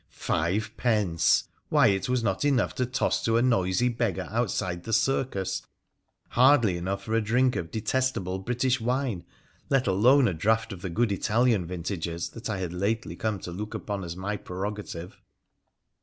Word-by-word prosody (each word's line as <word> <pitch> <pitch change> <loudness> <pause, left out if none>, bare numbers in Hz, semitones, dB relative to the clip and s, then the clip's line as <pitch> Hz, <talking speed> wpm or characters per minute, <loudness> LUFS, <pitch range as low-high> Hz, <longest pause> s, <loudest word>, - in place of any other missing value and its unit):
Five 90 +7 -1
pence! 105 -9 +2 0.3
Why, - - +5
it 95 +2 0
was 125 -2 +1
not 120 - 0
enough 140 -4 +2
to 125 - -1
toss 130 - 0
to 115 0 +2
a 120 - +3
Eoisy 115 +1 +2
beggar 115 -7 -1
outside 95 -6 -1
the 115 - -4
circus 110 -4 0 0.3
— - - -50 0.3
hardly 125 -6 +4
enough 95 +3 -3
for 110 - -4
a 115 - +3
drink 125 +4 +2
of 80 -1 -3
detestable 110 -4 -1
British 125 +5 0
wine, 125 -6 -1 0.5
let 135 -2 +2
alone 120 +8 +5
a 95 - 0
draught 110 +6 +1
of 90 - -10
the 95 - -4
good 110 +6 +1
Italian 110 -1 +2
vintages 85 -1 -4
that 115 -1 -7
I 110 - -1
had 90 -2 -4
lately 105 +5 -1
come 110 -2 -2
to 85 - -6
look 105 +5 -5
upon 100 -2 -4
as 85 0 -6
my 100 +3 -3
prerogative 95 -2 -6
105 Hz, 170 wpm, -27 LUFS, 95-120 Hz, 0.5 s, Why